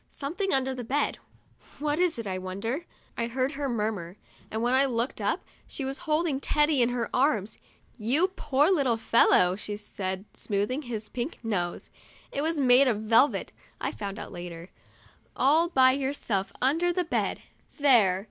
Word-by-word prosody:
"Something 360 +8 -3
under 265 -1 +1
the 250 -1 -6
bed 275 +6 -1 0.3
— - - -26
what 295 +1 -1
is 360 -2 +2
it, 230 - -5
I 185 -2 -3
wonder?" 225 - -4 0.3
I 235 - -1
heard 255 +3 -1
her 285 -2 -3
murmur, 210 -6 -3 0.3
and 220 +1 -3
when 245 +1 +2
I 265 +1 +5
looked 240 0 -2
up - - -1 0.2
she 275 - -5
was 270 +1 -5
holding 305 -3 +1
Teddy 295 -1 +2
in 240 - +4
her 245 -1 -2
arms. 235 -7 +1 0.4
"You 275 - +2
poor 300 -3 +1
little 270 -10 +2
fellow!' 185 -5 +4
she 205 +1 -5
said, 190 -2 -5
smoothing 210 +7 -1
his 225 -5 -5
pink 250 +5 -4
nose 180 -6 -3 0.4
(it 280 - -2
was 320 0 0
made 260 0 +6
of 215 -4 0
velvet, 230 +6 +3 0.3
I - - -2
found 200 -1 -6
out - - -7
later); 175 0 -8 0.7
"all 310 +6 +3
by 260 -5 +5
yourself 260 -8 -2
under 325 +7 +2
the 360 +1 0
bed. - - -1 0.3
There!" 235 - +4
255 Hz, 170 wpm, -27 LUFS, 210-290 Hz, 0.7 s, made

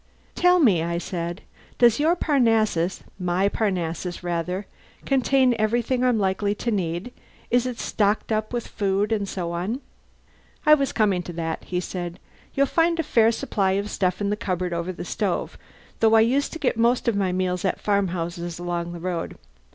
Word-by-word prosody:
"Tell 360 0 +4
me," 215 - +4
I 170 +1 -1
said, 170 0 -4 0.4
"does 235 0 +5
your 320 +4 +3
Parnassus 225 - +1 0.2
my 180 +2 +1
Parnassus, 180 -4 -2
rather 180 +3 -2 0.4
contain 265 -1 +3
everything 240 +3 +1
I'm 250 -2 +3
likely 200 +1 0
to 235 - -2
need? 185 +3 -2 0.4
Is 245 +1 +3
it 250 -2 -4
stocked 210 +1 0
up 215 0 -1
with 240 -2 -2
food 200 +1 0
and 205 -3 0
so 175 -3 -3
on?" 185 +9 -2 0.9
"I 305 - +8
was 275 -3 +3
coming 200 -5 +2
to 175 0 -8
that," 165 -1 -4
he 180 - -2
said. 175 -1 -5 0.4
"You'll 275 - +4
find 335 +4 +1
a - - +2
fair 230 -5 +4
supply 195 -4 0
of 200 +2 -2
stuff 185 -2 0
in 205 0 -1
the - - +1
cupboard 185 -4 -2
over 170 +2 -2
the 180 - -7
stove, - - -2 0.4
though 225 0 +5
I 220 - +7
used 265 +5 +2
to - - -4
get 280 -7 0
most 235 +2 +2
of 235 - +2
my 195 -2 +1
meals 180 -1 -1
at 190 - 0
farmhouses 175 -4 -1
along 175 0 -3
the 170 - -7
road. 175 -1 -4
200 Hz, 180 wpm, -24 LUFS, 175-235 Hz, 0.9 s, I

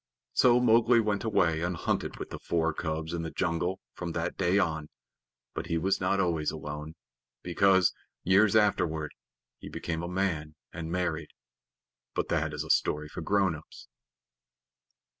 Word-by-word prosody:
So 125 -1 +5
Mowgli 120 0 +5
went 105 -2 0
away 85 -8 +2
and 90 +1 -1
hunted - - -2
with - - -7
the - - -6
four 80 -1 0
cubs 80 0 -3
in 85 - -2
the 80 - -4
jungle 85 +2 -1
from 85 -2 -5
that 80 0 -2
day 95 +1 +2
on. 80 -5 0 0.6
But - - -4
he 85 -1 0
was 95 +5 +1
not 95 +1 +1
always 85 -5 +1
alone, 75 +1 -6 0.5
because, 95 +1 +4 0.3
years 100 +4 +4
afterward, 80 -8 +2 0.5
he - - -9
became 80 -1 -3
a 85 - -4
man 85 -5 -1 0.2
and 80 -1 -5
married. 85 -3 -1 0.9
But - - -1
that - - 0
is - - -3
a - - 0
story 75 0 +1
for - - -6
grown 100 -3 +2
ups. 75 -4 -12
85 Hz, 160 wpm, -29 LUFS, 80-95 Hz, 0.9 s, So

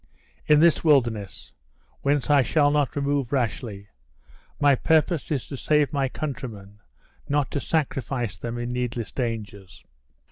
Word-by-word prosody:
"In 150 0 +6
this 170 -1 +4
wilderness, 120 - +1 0.5
whence 145 0 +1
I 145 -1 +6
shall 145 +3 +2
not 145 -3 0
remove 140 -3 -1
rashly. 115 -6 -2 0.7
My 145 -1 +5
purpose 160 +4 +1
is 145 -6 -2
to 140 - -5
save 150 +1 +1
my 135 -2 0
countrymen, 110 -9 -6 0.5
not 145 -1 0
to 145 - -1
sacrifice 130 - -2
them 115 +6 -5
in 120 +1 -4
needless 125 -2 -3
dangers." 110 -6 -5
135 Hz, 135 wpm, -25 LUFS, 115-145 Hz, 0.7 s, In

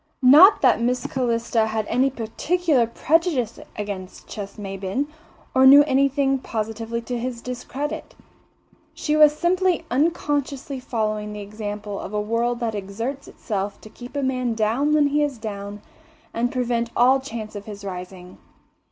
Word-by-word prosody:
Not 305 +11 +8
that - - +4
Miss 250 +1 0
Calista 230 -3 0
had 220 -1 -2
any 255 +5 +2
particular 270 +3 0
prejudice 275 - 0 0.2
against 200 -3 -6
Ches 200 -2 -7
Maybin, 195 +5 -3 0.5
or 260 0 +6
knew 285 +2 +9
anything 275 -1 +2
positively 225 0 -4
to 245 +1 -4
his 245 0 -4
discredit. 255 +4 -5 0.8
She 300 - -1
was 300 -1 +6
simply 365 0 +1
unconsciously 285 -2 -1
following 215 -4 -2
the 210 - -6
example 205 0 -6
of 210 - -6
a - - +1
world 230 +3 -1
that 230 -2 -1
exerts 225 +7 -5
itself 205 -2 -4
to 215 - -12
keep 245 +3 -11
a 285 - -1
man 255 -3 -1
down 230 +7 +1
when 300 -1 +4
he 290 +1 +1
is 290 -4 -1
down 205 -2 -7 0.5
and 240 +2 0
prevent 240 -2 -1
all 255 +3 +5
chance 225 -5 -7
of 205 0 -7
his 205 -1 -9
rising. 180 -1 -8
235 Hz, 150 wpm, -23 LUFS, 210-275 Hz, 0.8 s, knew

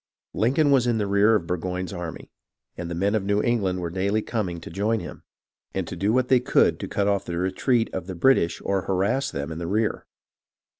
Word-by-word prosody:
Lincoln 140 +6 +2
was 130 -3 +4
in 120 -2 +2
the 105 - 0
rear 100 +3 +4
of 100 - 0
Burgoyne's 90 +2 -3
army, 85 -3 -7 0.4
and 85 -1 -5
the 85 - -4
men 100 +4 +1
of 110 -3 +1
New 100 +1 +1
England 95 -6 0
were 85 -1 -3
daily 100 +4 0
coming 95 -7 -3
to 80 - -9
join 105 +5 0
him, - - -9 0.5
and - - -1
do 100 +2 -1
what 125 +1 +2
they 130 -1 +5
could 125 - +2
to - - -4
cut 100 -1 0
off 100 -1 +1
the 85 - -4
retreat 110 +6 +1
of 95 -1 -4
the 95 - -5
British 85 -4 +3
or 100 -1 +1
harass 100 +9 0
them 70 +3 -4
in 80 - -5
the 85 - -4
rear. 105 +4 -1
100 Hz, 215 wpm, -24 LUFS, 90-110 Hz, 0.5 s, they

